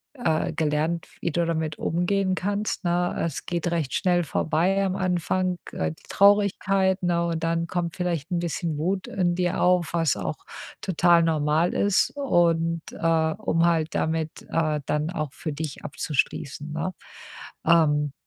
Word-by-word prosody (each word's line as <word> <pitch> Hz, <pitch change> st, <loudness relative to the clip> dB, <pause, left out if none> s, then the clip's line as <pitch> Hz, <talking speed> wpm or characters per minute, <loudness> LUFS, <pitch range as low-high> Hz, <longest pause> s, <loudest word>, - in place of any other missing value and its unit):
äh, 160 Hz, -, 0 dB
gelernt, 155 Hz, +2 st, -1 dB
wie 170 Hz, -, -1 dB
du 170 Hz, 0 st, +1 dB
damit 160 Hz, -2 st, -2 dB
umgehen 185 Hz, +3 st, 0 dB
kannst, 205 Hz, +2 st, -2 dB
ne? 175 Hz, +1 st, +1 dB
Es 160 Hz, -4 st, -4 dB
geht 175 Hz, -1 st, -1 dB
recht 160 Hz, -6 st, -1 dB
schnell 180 Hz, -2 st, +2 dB
vorbei 170 Hz, +6 st, +1 dB
am 190 Hz, -1 st, -1 dB
Anfang, 185 Hz, 0 st, 0 dB, 0.2 s
äh, 80 Hz, -1 st, -1 dB
die -, -, -15 dB
Traurigkeit, 195 Hz, -1 st, +3 dB
ne, 170 Hz, -1 st, +1 dB
und 165 Hz, -1 st, -2 dB
dann 165 Hz, 0 st, 0 dB
kommt 170 Hz, -1 st, -2 dB
vielleicht 175 Hz, -4 st, -2 dB
'n 175 Hz, -, +1 dB
bisschen 170 Hz, -2 st, -2 dB
Wut 185 Hz, +5 st, -1 dB
in 180 Hz, -2 st, 0 dB
dir 180 Hz, 0 st, 0 dB
auf, 180 Hz, -2 st, +2 dB
was 165 Hz, -5 st, +2 dB
auch -, -, -3 dB, 0.4 s
total 175 Hz, -1 st, +4 dB
normal 160 Hz, +1 st, +1 dB
ist 200 Hz, -2 st, +2 dB
und, 170 Hz, -, +2 dB
äh, 160 Hz, -1 st, +1 dB
um 165 Hz, +1 st, +1 dB
halt 165 Hz, -2 st, +1 dB
damit, 160 Hz, -1 st, -2 dB
äh, 155 Hz, -2 st, 0 dB
dann 150 Hz, +1 st, -1 dB
auch 155 Hz, -6 st, -3 dB
für 155 Hz, -, -5 dB
dich 150 Hz, -1 st, -6 dB
abzuschließen, 150 Hz, 0 st, -2 dB
ne? 160 Hz, +4 st, -3 dB, 0.7 s
Ähm. 150 Hz, -3 st, +3 dB
170 Hz, 155 wpm, -25 LUFS, 160-180 Hz, 0.7 s, total